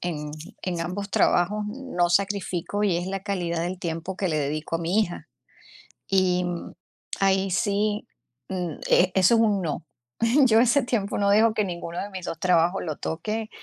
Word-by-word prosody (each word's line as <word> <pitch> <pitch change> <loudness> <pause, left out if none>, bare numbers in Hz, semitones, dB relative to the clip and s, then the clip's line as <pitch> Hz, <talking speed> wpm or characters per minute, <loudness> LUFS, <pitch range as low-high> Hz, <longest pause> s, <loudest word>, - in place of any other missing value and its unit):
en 150 -4 -4 0.3
en 175 -2 -2
ambos 190 +4 -4
trabajos 205 +4 +2
no 210 -7 -1
sacrifico, 195 +1 0
y 195 -5 +2
es 175 +1 -3
la 195 0 -3
calidad 175 -4 -2
del 175 +2 -3
tiempo 170 +1 -4
que 190 - -1
le 155 -2 0
dedico 150 +3 -2
a - - -7
mi 170 +6 +1
hija. 175 -5 -3 0.8
Y 185 -2 +2 0.7
ahí 195 -1 +2
sí, 205 +2 0 0.4
mm, 180 -3 -2 0.2
e 185 +1 +5
eso 190 +4 +5
es 225 - +4
un 210 -3 +2
no. 165 -1 -3 0.6
Yo 225 -3 +5
ese 250 +4 +4
tiempo 220 -5 -1
no 200 -1 +2
dejo 215 +2 +5
que 215 - +1
ninguno 170 -2 -5
de 200 - -5
mis 185 -3 -7
2 - - -4
trabajos 175 +1 +2
lo 155 -4 -4
toque, 215 +7 -3
185 Hz, 175 wpm, -25 LUFS, 170-205 Hz, 0.8 s, e